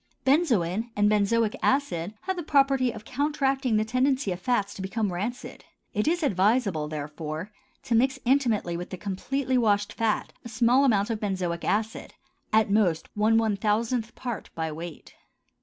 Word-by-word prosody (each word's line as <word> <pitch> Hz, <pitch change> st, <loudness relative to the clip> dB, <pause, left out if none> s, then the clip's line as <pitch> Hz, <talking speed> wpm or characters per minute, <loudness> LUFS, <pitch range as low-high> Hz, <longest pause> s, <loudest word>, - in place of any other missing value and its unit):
Benzoin 235 Hz, -, +2 dB
and 210 Hz, 0 st, +3 dB
benzoic 215 Hz, +1 st, +2 dB
acid 210 Hz, -9 st, 0 dB
have 380 Hz, 0 st, -2 dB
the 350 Hz, -, -3 dB
property 275 Hz, -4 st, +3 dB
of 220 Hz, -2 st, -10 dB
counteracting 270 Hz, -3 st, 0 dB
the 215 Hz, -, +1 dB
tendency 255 Hz, -1 st, +1 dB
of 180 Hz, -, -4 dB
fats 205 Hz, -1 st, 0 dB
to -, -, -8 dB
become 195 Hz, 0 st, -2 dB
rancid; 220 Hz, +8 st, -5 dB, 0.3 s
it 210 Hz, +5 st, 0 dB
is 345 Hz, +1 st, +1 dB
advisable, 200 Hz, -, +2 dB
therefore, 155 Hz, +4 st, -5 dB, 0.3 s
to -, -, -2 dB
mix 260 Hz, +4 st, +3 dB
intimately 235 Hz, -9 st, +2 dB
with 175 Hz, +1 st, -5 dB
the 185 Hz, -, -6 dB
completely 255 Hz, +8 st, -1 dB
washed 205 Hz, -2 st, +1 dB
fat 225 Hz, -2 st, -1 dB
a 235 Hz, -, -8 dB
small 240 Hz, +4 st, +3 dB
amount 210 Hz, -4 st, +2 dB
of 220 Hz, -, -2 dB
benzoic 185 Hz, -5 st, -2 dB
acid, 220 Hz, +2 st, -2 dB, 0.4 s
at 215 Hz, -2 st, +3 dB
most 190 Hz, -6 st, +2 dB
one 215 Hz, +2 st, +3 dB
one 220 Hz, -2 st, +2 dB
thousandth 225 Hz, +3 st, -1 dB
part 240 Hz, -6 st, -5 dB
by 160 Hz, -1 st, -2 dB
weight. 165 Hz, +1 st, -8 dB
220 Hz, 160 wpm, -26 LUFS, 195-255 Hz, 0.4 s, and